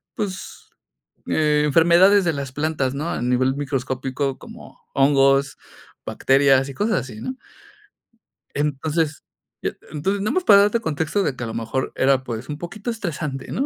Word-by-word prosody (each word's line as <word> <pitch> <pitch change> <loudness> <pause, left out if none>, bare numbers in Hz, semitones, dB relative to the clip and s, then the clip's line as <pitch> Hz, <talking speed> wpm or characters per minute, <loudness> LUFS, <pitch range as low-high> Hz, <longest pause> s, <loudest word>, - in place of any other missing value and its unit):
pues, 195 -4 -6 0.6
eh, 150 -1 +2
enfermedades 175 +6 +5
de 165 - +1
las 140 -2 -5
plantas, 145 -3 -1
¿no? 155 +4 -3
A - - -3
nivel 130 +2 +1
microscópico, 135 0 -2
como - - -13
hongos, 135 0 +3 0.5
bacterias 135 0 +3
y 140 - -7
cosas 215 +6 0
así, 115 -5 -9
¿no? 260 - -4 1.2
Entonces, 150 +2 -1 0.4
y - - 0
e - - -15
entonces, 190 +7 -1
nada 210 - 0
más 370 -1 0
para 200 - +7
darte 210 +3 +1
contexto 160 +3 -1
de 140 - -1
que 120 - -6
a - - -3
lo 110 - -5
mejor 115 +3 -3
era, 135 -1 +2
pues, 120 +2 -6
un 145 - -4
poquito 195 +8 -6
estresante, 155 - -5
¿no? 275 - -1
145 Hz, 165 wpm, -22 LUFS, 135-175 Hz, 1.2 s, para